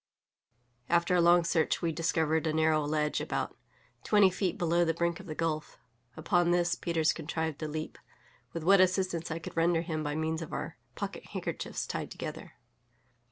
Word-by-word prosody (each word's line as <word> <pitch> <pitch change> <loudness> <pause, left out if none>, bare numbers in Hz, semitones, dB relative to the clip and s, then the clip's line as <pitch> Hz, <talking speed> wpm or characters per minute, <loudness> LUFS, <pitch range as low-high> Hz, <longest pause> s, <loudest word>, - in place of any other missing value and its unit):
After 170 +1 +3
a 175 - +4
long 175 0 +6
search 165 -1 +1
we 165 - +1
discovered 160 -1 +1
a 155 - 0
narrow 155 -1 +3
ledge 150 0 0
about - - -3 0.5
twenty 205 -3 +5
feet 185 -1 -1
below 175 0 +2
the 165 -1 +1
brink 170 0 0
of 190 - -11
the 155 - -5
gulf; 155 -2 -2 0.4
upon 175 +2 +2
this 175 -1 +2
Peters 165 -2 +1
contrived 160 -1 -3
to 155 - -3
leap, 155 +1 -5 0.5
with 165 - -5
what 195 +2 +6
assistance 185 -2 +1
I 160 - -2
could 165 - -8
render 165 0 +3
him 160 -2 -3
by 145 0 -2
means 160 +1 -1
of 165 - -7
our - - -4 0.2
pocket - - -5
handkerchiefs - - -4
tied - - -4
together. - - -7
165 Hz, 175 wpm, -30 LUFS, 160-175 Hz, 0.5 s, long